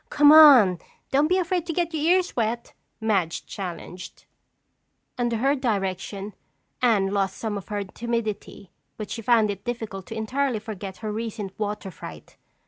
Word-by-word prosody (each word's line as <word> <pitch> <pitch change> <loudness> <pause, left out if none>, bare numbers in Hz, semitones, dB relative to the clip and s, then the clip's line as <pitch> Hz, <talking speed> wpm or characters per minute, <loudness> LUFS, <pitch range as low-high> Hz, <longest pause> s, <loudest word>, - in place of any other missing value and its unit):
"Come 290 0 +6
on, 265 - +8 0.3
don't 285 +3 +3
be 365 +3 +2
afraid 360 -1 -1
to 330 - -2
get 345 0 -1
your 310 - -2
ears 370 -1 -1
wet!" 235 0 -2 0.3
Madge 195 -7 0
challenged. 180 -1 -8 0.9
Under 240 -2 -1
her 270 +5 +2
direction, 200 -5 -2 0.5
Anne 215 -6 +3
lost 195 -1 -1
some 220 -2 -3
of 200 - -6
her 205 -1 -3
timidity 215 -2 -4 0.3
but 215 - -6
she 230 - -4
found 225 -2 +3
it 200 0 -8
difficult 225 -6 -5
to 225 - -7
entirely 255 +3 -1
forget 205 -3 -7
her 215 - -2
recent 215 -3 -5
water 210 -2 -3
fright. - - -11
220 Hz, 155 wpm, -25 LUFS, 200-250 Hz, 0.9 s, on